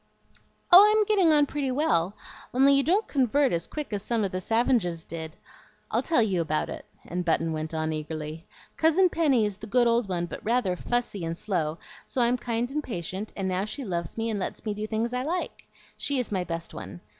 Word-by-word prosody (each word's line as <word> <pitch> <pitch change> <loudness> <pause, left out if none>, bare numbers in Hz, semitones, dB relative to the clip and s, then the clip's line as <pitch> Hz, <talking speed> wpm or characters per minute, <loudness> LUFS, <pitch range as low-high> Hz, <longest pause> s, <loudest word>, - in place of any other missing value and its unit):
"Oh, 365 +3 +11
I'm 430 0 +4
getting 390 -6 +4
on 295 -1 +5
pretty 285 -1 -2
well, 210 - +1 0.4
only 275 +2 +6
you 275 - +5
don't 375 +9 +1
CONVERT 275 -1 +2
as 170 0 -1
quick 300 -7 -5
as 205 - -1
some 225 +1 0
of 195 - -1
the 185 - -2
savinges 220 -6 +1
did. 160 -1 -6 0.6
I'll - - +2
tell 315 -8 +2
you 190 -5 +1
about 155 -1 -1
it;" - - -8 0.2
and 180 +1 -3
Button 165 -1 +1
went 155 0 -4
on 160 -1 -1
eagerly. 155 +1 -6 0.3
"Cousin 335 +4 +4
Penny 285 -10 +2
is 205 -2 -3
the 220 - -9
good 240 +3 +3
old 235 -3 +2
one, 175 -2 -1
but 175 - -8
rather 225 -5 +1
fussy 235 -2 -2
and 165 0 -3
slow, 165 -6 -2 0.3
so - - -4
I'm 240 +1 +3
kind 240 +1 -2
and 300 +1 -2
patient, 190 - -5
and 195 -1 -1
now 185 +1 0
she 270 +6 -6
loves 170 -5 -4
me 225 0 -1
and 210 - -2
lets 190 - -4
me 210 - -1
do 210 +1 -4
things 225 +2 -2
I 250 - 0
like. 335 +7 -4 0.3
She 285 - 0
is 250 -4 -2
my 190 -3 0
best 165 -1 -5
one. 95 -3 -8
215 Hz, 215 wpm, -27 LUFS, 170-265 Hz, 0.6 s, Oh